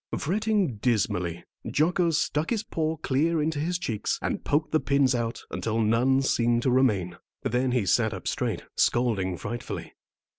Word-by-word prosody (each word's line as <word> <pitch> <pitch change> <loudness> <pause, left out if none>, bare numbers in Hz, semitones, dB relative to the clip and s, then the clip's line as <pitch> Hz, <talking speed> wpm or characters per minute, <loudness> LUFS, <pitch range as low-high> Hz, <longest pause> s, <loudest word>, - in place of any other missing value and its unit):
Fretting 200 - 0
dismally, 90 -7 0 0.3
Jocko 170 +3 +2
stuck 155 -1 0
his 225 -2 0
paw 160 -7 -2
clear 155 +3 +1
into 155 0 0
his 175 +4 -1
cheeks, 110 -11 -2
and - - -3
poked 150 +2 0
the 155 - +3
pins 140 -3 +2
out 120 -1 -2
until 115 0 -2
none 120 +5 +3
seemed 120 -2 +2
to 130 - +2
remain. 105 -9 +2 0.3
Then 125 +2 0
he 120 -5 +1
sat - - +2
up - - -6
quite - - -6
straight, - - -2
scolding 100 -7 +1
frightfully. 120 +6 -6
130 Hz, 160 wpm, -26 LUFS, 115-160 Hz, 0.3 s, the